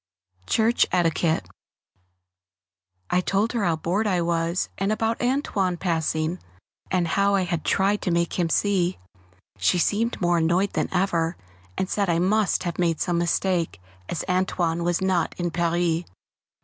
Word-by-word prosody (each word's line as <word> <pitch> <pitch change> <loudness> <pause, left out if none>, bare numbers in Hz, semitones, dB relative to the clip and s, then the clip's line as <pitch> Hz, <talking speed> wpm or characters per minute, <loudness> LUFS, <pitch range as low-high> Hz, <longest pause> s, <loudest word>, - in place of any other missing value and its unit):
[Sidenote: 95 0 -29
Church 225 +1 +3
Etiquette] 165 -2 +1 1.6
I 180 - +3
told 200 +5 0
her 230 -4 0
how 170 -2 +2
bored 185 +7 -1
I 185 -3 +1
was, 170 +1 0
and 195 +2 +1
about 225 +1 -1
"Antoine" 230 -8 0
passing, 165 -1 -1 0.5
and 180 -2 +1
how 200 +2 +2
I 190 - +2
had 175 -3 -2
tried 200 +1 +1
to - - -1
make 170 +1 0
him 170 -2 +1
see. 185 0 +1 0.6
She 180 - +2
seemed 220 +6 0
more 175 -2 +2
annoyed 175 +5 +1
than - - -1
ever, 175 -3 0 0.4
and 190 - 0
said 200 -1 0
I 170 - +2
must 195 +4 +2
have 175 -1 -4
made 170 -3 +1
some 175 -1 0
mistake, 170 - 0 0.3
as 170 - -3
"Antoine" 180 -2 0
was 175 +2 0
not 185 -3 0
in 175 -1 -1
Paris. 170 0 0
175 Hz, 155 wpm, -24 LUFS, 170-195 Hz, 1.6 s, Church